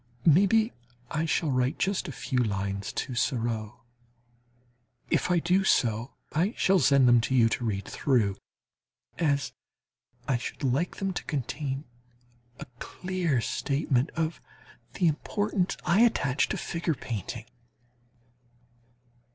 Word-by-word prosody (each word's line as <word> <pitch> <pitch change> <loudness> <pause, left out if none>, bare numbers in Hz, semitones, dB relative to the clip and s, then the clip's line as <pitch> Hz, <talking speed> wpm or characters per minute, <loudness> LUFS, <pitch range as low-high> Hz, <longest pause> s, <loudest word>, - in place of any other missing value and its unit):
Maybe 200 - +4 0.4
I 155 +1 0
shall 160 -1 +1
write 130 +1 +1
just 195 -1 0
a - - -4
few 130 -1 -2
lines 100 -3 -1
to 130 - -3
Seurat. 115 -3 -1 1.4
If - - +2
I 180 - +3
do 180 +3 +2
so, 115 - +1 0.2
I 180 +8 +1
shall 190 0 +4
send 135 -2 +5
them 120 -1 +6
to 130 +3 -1
you 115 -3 +6
to 115 - -2
read 100 -4 -2
through, 110 -8 +1 0.8
as 140 -4 +1 0.7
I 130 - +2
should 120 - -7
like 135 +7 0
them 195 -1 -2
to - - -4
contain 140 -1 -3 0.8
a - - -6
clear 180 -8 -1
statement 140 0 0
of 160 0 -2 0.5
the 180 - +1
importance 195 +4 -1
I 195 - +3
attach 145 - +2
to - - -1
figure 170 -2 -2
painting. 115 -1 -5
140 Hz, 125 wpm, -28 LUFS, 120-175 Hz, 1.4 s, them